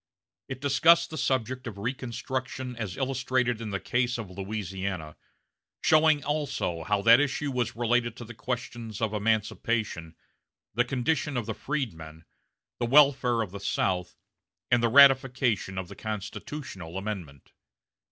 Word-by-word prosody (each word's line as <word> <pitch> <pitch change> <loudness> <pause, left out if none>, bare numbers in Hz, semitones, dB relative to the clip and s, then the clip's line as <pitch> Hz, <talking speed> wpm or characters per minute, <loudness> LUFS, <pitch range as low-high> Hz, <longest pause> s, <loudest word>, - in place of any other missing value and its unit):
It 130 - -6
discussed 160 +5 +4
the - - -5
subject 130 0 -1
of 105 -4 -7
reconstruction 130 +2 -4
as 110 -6 -5
illustrated 130 -3 0
in 110 - -4
the 100 -1 -2
case 120 +3 0
of 110 -5 -7
Louisiana, 95 -4 -4 0.7
showing 155 -1 +4
also 140 - -2
how 100 +3 0
that 115 +2 +8
issue 145 0 0
was 125 -3 -1
related 120 0 +1
to 120 - -8
the 120 - -9
questions 115 -2 -5
of 110 -2 -1
emancipation, 105 -5 -1 0.6
the 120 +3 +2
condition 135 +2 -1
of 120 - -2
the 110 - -3
freedmen, 80 - -5 0.5
the 120 - 0
welfare 130 -4 +5
of 100 - -8
the 100 - -7
South, 90 -2 -1 0.5
and 120 -1 +4
the 115 - +3
ratification 130 -6 +4
of 95 -1 -3
the - - -10
constitutional 105 - -6
amendment. 95 -9 -6
120 Hz, 140 wpm, -28 LUFS, 100-130 Hz, 0.7 s, that